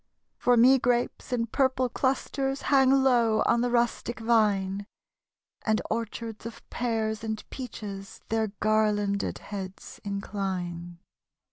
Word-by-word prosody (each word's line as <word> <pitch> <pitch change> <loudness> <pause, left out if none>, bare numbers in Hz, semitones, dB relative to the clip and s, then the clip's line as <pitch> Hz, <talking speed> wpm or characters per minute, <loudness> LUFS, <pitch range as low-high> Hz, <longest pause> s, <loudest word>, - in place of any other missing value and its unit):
For 245 -1 +4
me 260 +3 +7
grapes 245 +1 0
in 235 -2 +1
purple 260 +1 +1
clusters 270 +2 -1
Hang 265 -1 +6
low 245 -5 +4
on 235 - +3
the 245 - +1
rustic 240 -1 0
vine; 205 -4 +1 0.8
And 220 -1 +2
orchards 225 0 -4
of 230 - -11
pears 220 -3 -1
and 220 -1 -4
peaches 205 -6 -7
Their 220 0 +1
garlanded 210 -2 +1
heads 195 -2 -8
incline. 185 -4 -4
225 Hz, 115 wpm, -27 LUFS, 205-245 Hz, 0.8 s, me